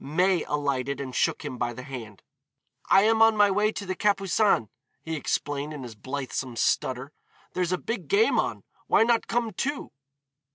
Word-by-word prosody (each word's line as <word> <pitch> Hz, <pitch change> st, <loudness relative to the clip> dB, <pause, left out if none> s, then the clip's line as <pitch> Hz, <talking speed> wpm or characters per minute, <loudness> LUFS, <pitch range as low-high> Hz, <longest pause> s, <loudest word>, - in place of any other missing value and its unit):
May 180 Hz, +4 st, +2 dB
alighted 140 Hz, -2 st, -1 dB
and 130 Hz, -2 st, -5 dB
shook -, -, 0 dB
him 125 Hz, -, -5 dB
by 120 Hz, 0 st, -1 dB
the 125 Hz, -, -8 dB
hand. 115 Hz, -7 st, -9 dB, 0.7 s
"I 195 Hz, -, +6 dB
am 225 Hz, +1 st, +3 dB
on 225 Hz, -1 st, +6 dB
my 205 Hz, -1 st, +5 dB
way 210 Hz, +2 st, +2 dB
to 200 Hz, -, -5 dB
the 185 Hz, -, -2 dB
Capucines," 195 Hz, -, +2 dB, 0.4 s
he 160 Hz, 0 st, -3 dB
explained, 145 Hz, 0 st, -2 dB
in 145 Hz, -3 st, -7 dB
his 120 Hz, -2 st, -8 dB
blithesome 130 Hz, +1 st, -5 dB
stutter. 130 Hz, +3 st, 0 dB, 0.4 s
"There's 180 Hz, -1 st, -1 dB
a 185 Hz, -, +1 dB
big 230 Hz, +6 st, -5 dB
game 425 Hz, +3 st, +3 dB
on; -, -, -2 dB, 0.2 s
why -, -, +5 dB
not 235 Hz, 0 st, +2 dB
come, 235 Hz, -1 st, 0 dB
too?" 280 Hz, +9 st, -3 dB
160 Hz, 175 wpm, -26 LUFS, 130-210 Hz, 0.7 s, I